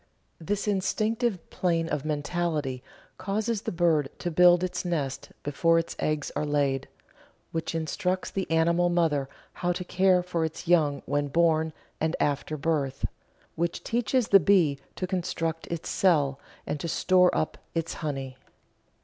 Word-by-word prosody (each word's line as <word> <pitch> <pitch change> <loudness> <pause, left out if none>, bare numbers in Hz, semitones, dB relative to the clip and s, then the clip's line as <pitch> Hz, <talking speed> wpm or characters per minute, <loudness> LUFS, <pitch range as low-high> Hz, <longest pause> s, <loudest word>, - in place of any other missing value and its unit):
This 200 +5 -2
Instinctive 210 +1 0
plane 165 -2 0
of 150 -3 -2
mentality 150 -3 -1 0.4
causes 205 +3 -1
the - - -3
bird 165 -5 +2
to 175 - -3
build 175 +2 +6
its 185 - -2
nest 150 -7 -3
before 165 +4 +2
its 165 - -1
eggs 155 -2 -1
are - - 0
laid, 145 -3 0 0.6
which 165 0 -3
instructs 180 +3 -1
the 190 -1 -3
animal 170 +2 +3
mother 160 -6 +1 0.3
how 175 0 +2
to 180 - -4
care 185 0 +3
for 175 -2 -1
its 160 +2 -4
young 155 -5 +3
when 145 0 0
born, 160 +1 +2 0.3
and 160 +1 0
after 145 +1 0
birth; 140 -3 -1 0.5
which 170 +1 -2
teaches 240 +1 0
the 195 - +8
bee 165 -6 +3 0.2
to 185 - -2
construct 165 -3 -2
its 170 -1 -4
cell 145 -7 +2 0.3
and 150 - -3
to 170 - -3
store 180 +2 +4
up 155 - -2 0.2
its 165 0 -1
honey. 135 -4 -4
165 Hz, 150 wpm, -27 LUFS, 150-180 Hz, 0.6 s, the